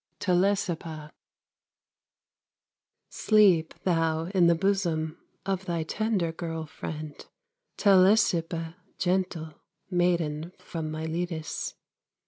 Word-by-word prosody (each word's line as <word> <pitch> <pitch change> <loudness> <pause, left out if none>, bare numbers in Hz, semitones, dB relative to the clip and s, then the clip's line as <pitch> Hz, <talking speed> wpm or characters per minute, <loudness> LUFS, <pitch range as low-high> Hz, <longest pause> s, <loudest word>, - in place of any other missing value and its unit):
TELESIPPA 175 -5 0 2.0
Sleep 195 -7 +3
thou 165 -1 +1
in 180 -3 +5
the 170 - +5
bosom 170 -4 0 0.3
Of 190 -1 -2
thy 170 -2 -1
tender 200 -1 -1
girl 165 -1 -5
friend, 155 -1 -7 0.5
Telesippa, 185 -4 +3 0.2
gentle 180 -4 -1 0.4
Maiden 170 -2 0
from 160 -2 -5
Miletus. 160 +1 -3
170 Hz, 80 wpm, -27 LUFS, 160-185 Hz, 2.0 s, in